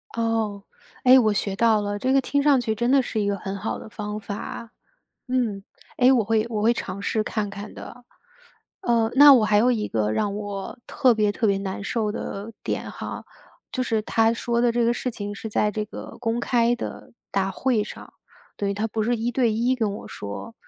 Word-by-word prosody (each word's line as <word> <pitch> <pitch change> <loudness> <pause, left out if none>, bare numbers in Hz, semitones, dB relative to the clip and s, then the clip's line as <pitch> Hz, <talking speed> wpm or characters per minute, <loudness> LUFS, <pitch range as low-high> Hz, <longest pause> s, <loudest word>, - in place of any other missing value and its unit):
哦。 225 -3 -1 0.4
哎， 255 +1 +8
我 220 -3 +3
学 200 -1 -1
到 220 0 +3
了， 205 0 -2
这 255 +5 0
个 270 - +5
听 285 +2 0
上 285 -2 +5
去 220 -2 -1
真 240 +3 +1
的 275 0 +5
是 240 -3 -3
一 200 - 0
个 200 - +1
很 195 0 -5
好 205 - -3
的 - - -10
方 210 0 -5
法， 215 +2 -7 0.6
嗯。 235 -6 0 0.3
诶， 255 +1 +5
我 240 -4 +3
会 220 +1 +1
我 215 -3 -2
会 230 +2 +5
尝 195 -4 -5
试 215 +2 0
看 215 -1 -2
看 200 +1 -8
的。 245 0 -10 0.8
呃， 230 -7 +2
那 285 0 +10
我 235 -4 +4
还 210 -1 +3
有 240 +4 +4
一 220 -4 0
个 110 -1 0
让 200 - 0
我 205 -2 -5
特 255 -3 +3
别 210 -2 +2
特 220 +2 0
别 200 -1 +2
难 195 0 -5
受 215 0 -1
的 210 +1 -5
点 - - -3
哈， - - -7 0.5
就 255 - -1
是 225 -3 0
他 225 +1 +2
说 235 0 -1
的 240 -1 +3
这 240 +1 +1
个 235 +1 +2
事 250 - -2
情 205 -2 -6
是 215 - -8
在 210 0 +1
这 215 +1 -3
个 210 - -9
公 230 -1 -1
开 240 -1 +2
的 240 - -7 0.2
大 195 -1 0
会 225 +2 0
上， - - -11 0.4
对， 200 -1 -1
他 205 +2 -1
不 220 0 -2
是 240 +3 +1
一 230 +2 -1
对 240 -2 +2
一 235 +4 +1
跟 220 -5 -1
我 - - -10
说， 100 - -7
220 Hz, 230 characters per minute, -24 LUFS, 205-240 Hz, 0.8 s, 那